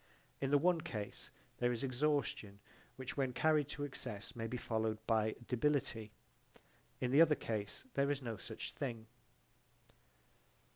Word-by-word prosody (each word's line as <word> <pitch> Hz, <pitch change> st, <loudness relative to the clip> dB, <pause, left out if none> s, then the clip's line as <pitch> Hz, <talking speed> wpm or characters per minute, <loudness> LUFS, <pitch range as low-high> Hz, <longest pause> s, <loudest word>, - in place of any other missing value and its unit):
In 135 Hz, -, 0 dB
the 145 Hz, -, +6 dB
one 170 Hz, +2 st, +3 dB
case 105 Hz, -7 st, -5 dB, 0.3 s
there 120 Hz, 0 st, +3 dB
is 120 Hz, 0 st, -2 dB
exhaustion 130 Hz, -6 st, 0 dB, 0.4 s
which 130 Hz, +1 st, -5 dB
when 130 Hz, -2 st, +1 dB
carried 155 Hz, +1 st, +3 dB
to 150 Hz, -1 st, -4 dB
excess 125 Hz, -4 st, -5 dB
may 115 Hz, -1 st, -2 dB
be 125 Hz, +2 st, -3 dB
followed 110 Hz, -2 st, 0 dB
by 110 Hz, -1 st, +2 dB
debility: 125 Hz, -4 st, +1 dB, 0.9 s
in 125 Hz, -, 0 dB
the 145 Hz, +4 st, +7 dB
other 155 Hz, -2 st, +7 dB
case 105 Hz, -, -3 dB
there 140 Hz, 0 st, +2 dB
is 145 Hz, -1 st, +1 dB
no 115 Hz, -2 st, -2 dB
such -, -, -6 dB
thing. 115 Hz, -5 st, -4 dB
125 Hz, 145 wpm, -37 LUFS, 110-145 Hz, 0.9 s, the